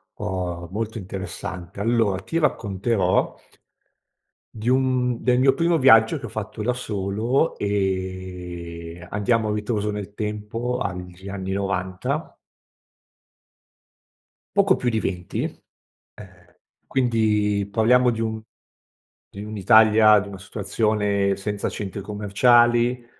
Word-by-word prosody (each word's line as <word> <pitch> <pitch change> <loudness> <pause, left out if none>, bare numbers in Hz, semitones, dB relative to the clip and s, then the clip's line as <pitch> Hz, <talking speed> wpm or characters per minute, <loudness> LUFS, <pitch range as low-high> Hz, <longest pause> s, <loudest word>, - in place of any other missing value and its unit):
Oh, 90 -4 -4
molto 110 +2 -3
interessante, 95 -1 -7
allo 115 -2 +2
ti 165 - -2
racconterò 100 - 0 1.2
di 110 +1 -7
un 125 -2 +1
del 125 -1 +3
mio 135 +1 +5
primo 170 +3 +2
viaggio 130 0 +5
che 130 - -8
ho - - -6
fatto 110 0 -6
da 125 +3 +1
solo 110 +5 -1
e 90 -3 -4
andiamo 110 +2 +1
a 105 - 0
ritroso 105 0 -1
nel 105 -1 -6
tempo 105 +4 -3
agli 90 0 -6
anni 95 -1 -4
'90. 95 - -3 2.2
Poco 200 -1 +4
più 125 - -1
di 110 -2 0
20, 90 -4 -3 0.7
ehm, 90 -3 -16 0.3
quindi 105 -5 +1
parliamo 125 +4 +4
di 115 - -2
un 110 -1 -2 0.9
di 100 +1 -9
un'Italia 110 +1 +5
di 100 - -7
una 100 -1 -9
situazione 100 0 0
senza 105 +1 -3
centri 100 -1 -5
commerciali, 120 +4 +3
105 Hz, 110 wpm, -23 LUFS, 95-115 Hz, 2.2 s, mio